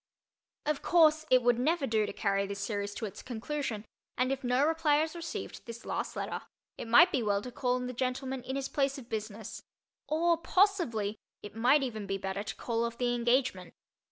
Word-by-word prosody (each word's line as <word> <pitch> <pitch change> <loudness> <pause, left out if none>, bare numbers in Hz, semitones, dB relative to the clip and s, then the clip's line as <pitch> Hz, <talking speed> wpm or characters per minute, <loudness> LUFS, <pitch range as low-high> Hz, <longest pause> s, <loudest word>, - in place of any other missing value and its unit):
Of 300 -1 0
course, 315 -2 +4
it 255 -1 +5
would 240 0 +3
never 310 +3 +1
do 220 -3 +1
to - - -4
carry 200 -2 0
this 200 0 -5
series 205 0 -3
to 225 - -3
its 200 - -7
conclusion 240 -2 -4 0.3
and 255 +1 +1
if 270 0 -2
no 250 +3 +3
reply 315 -2 +3
is 320 - -4
received 335 -1 -5
to - - -19
this 230 0 -8
last - - -3
letter - - -3 0.3
it - - -7
might 340 +11 +7
be 265 - +1
well 205 -2 0
to 250 - -6
call 250 0 0
on 250 0 -2
the 250 - -4
gentleman 260 +1 -2
in 260 +2 -5
his 275 -1 -2
place 275 -1 0
of 250 -3 -11
business—or, 230 +9 -3
possibly, 330 - +1 0.2
it 205 - -9
might 255 +6 +4
even 220 -6 -4
be 195 0 -1
better 195 +1 -3
to 210 - -5
call 230 -1 -1
off 235 0 -3
the 245 -1 +1
engagement. 240 -6 0
250 Hz, 205 wpm, -31 LUFS, 220-285 Hz, 0.3 s, might